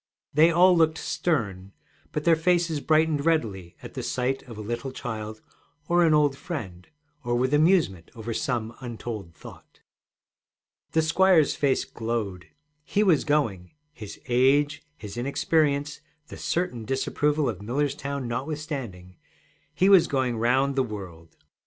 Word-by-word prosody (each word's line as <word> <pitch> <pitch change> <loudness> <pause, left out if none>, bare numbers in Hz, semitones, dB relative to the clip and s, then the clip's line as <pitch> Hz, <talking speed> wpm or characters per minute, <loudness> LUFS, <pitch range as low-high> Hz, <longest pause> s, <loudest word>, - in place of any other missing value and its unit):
They 155 +3 +6
all 180 +2 +5
looked 160 -1 +3
stern, 100 - -2 0.4
but 150 - -3
their 170 0 +5
faces 170 -1 +1
brightened 155 -1 +2
readily 105 - -1
at - - -7
sight 130 +1 -1
of 115 - -9
a - - -6
little 120 +5 -4
child 110 -4 -6 0.5
or 175 0 +3
an 160 -2 +4
old 145 -2 +3
friend, 95 - -7 0.4
or 120 0 -1
with 130 +3 0
amusement 150 - +2
over 115 0 -5
some 115 -1 -2
untold 115 -8 -7
thought. - - -14 1.1
The 160 - +3
squire's 165 -1 +4
face 140 -2 +1
glowed. 110 -6 -4 0.4
He 205 +7 +1
was 175 -8 +3
going 115 -12 -1 0.2
his 105 -6 -10
age, 140 +4 +3 0.2
his 105 +1 -9
inexperience, 145 +2 0 0.3
the - - -9
certain 170 -10 -2
disapproval 145 +4 0
of 105 -6 -4
Millerstown 140 +2 -2
notwithstanding 125 - -5 0.5
he 190 - +2
was 195 -4 +6
going 130 -3 0
round 130 +4 +1
the 135 - +2
world! 95 -9 -8
135 Hz, 135 wpm, -26 LUFS, 110-155 Hz, 1.1 s, They